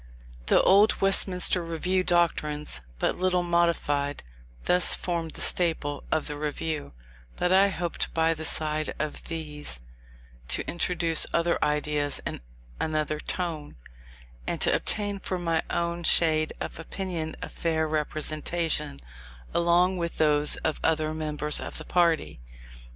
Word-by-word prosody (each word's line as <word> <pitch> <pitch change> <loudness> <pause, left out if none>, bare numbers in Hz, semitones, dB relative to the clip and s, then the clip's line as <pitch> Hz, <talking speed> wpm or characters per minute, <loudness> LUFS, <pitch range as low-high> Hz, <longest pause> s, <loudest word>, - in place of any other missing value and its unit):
The - - +4
old 205 +3 +5
Westminster 185 -2 +4
Review 180 +3 -1
doctrines, 150 - 0 0.2
but - - -1
little 180 -1 +1
modified, 170 -5 0 0.4
thus 180 0 +4
formed 170 -2 -3
the - - -6
staple 160 -5 +1
of 155 - 0
the 150 - -4
Review; 150 - -4 0.4
but 180 - 0
I 195 +2 +5
hoped 175 -3 -3
by 165 0 +2
the 160 0 -7
side 155 -1 +1
of 155 -1 -4
these, 150 - -3 0.7
to - - +1
introduce 175 -2 +1
other 170 0 +1
ideas 150 -1 0
and - - -5 0.4
another 155 -1 -1
tone, 160 - -4 0.7
and - - -2
to - - +3
obtain 205 -1 -1
for 185 - -3
my 165 -2 0
own 170 0 -2
shade 155 -2 +3
of - - -6
opinion 165 -2 -5
a - - -4
fair 160 -1 -1
representation, 155 - -1 0.5
along 175 +2 +3
with 170 -1 -4
those 150 -1 +5
of 155 - -1
other 155 -1 +1
members 150 -1 0
of - - -6
the - - -7
party. 165 - +1
165 Hz, 135 wpm, -26 LUFS, 150-175 Hz, 0.7 s, old